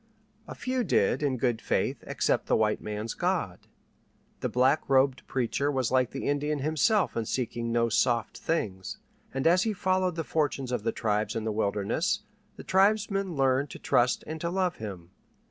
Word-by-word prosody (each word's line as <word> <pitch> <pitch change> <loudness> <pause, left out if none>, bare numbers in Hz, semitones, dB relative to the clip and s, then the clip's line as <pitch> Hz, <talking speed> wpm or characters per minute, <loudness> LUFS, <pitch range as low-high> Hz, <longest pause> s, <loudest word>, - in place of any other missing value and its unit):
A - - -7
few 255 0 -1
did, - - +2
in 140 -3 0
good 120 -2 0
faith, - - -1
accept - - 0
the - - +3
white 105 -1 +1
man's 105 +1 -4
God. - - -2 0.7
The - - -2
black 130 +4 +3
robed 135 -1 +3
preacher 135 +3 0
was 130 -4 0
like 130 -2 +3
the 135 - -5
Indian 145 +1 0
himself 160 - +1
in 115 - -1
seeking 120 -1 -2
no 115 0 +2
soft 115 0 +1
things, 95 - -2 0.3
and 135 0 -3
as 175 +2 +5
he 220 +1 0
followed 185 -2 0
the 165 - -2
fortunes 145 -4 -1
of 125 -3 -1
the 115 +2 0
tribes 105 0 -1
in 115 - -2
the 110 - -1
wilderness, 100 -2 0 0.3
the - - -10
tribesmen 195 -1 +2
learned 135 +1 +2
to - - -8
trust 120 +1 +2
and 155 +1 -6
to 170 - -1
love 185 -1 0
him. 95 -5 -8
130 Hz, 180 wpm, -28 LUFS, 115-165 Hz, 0.7 s, as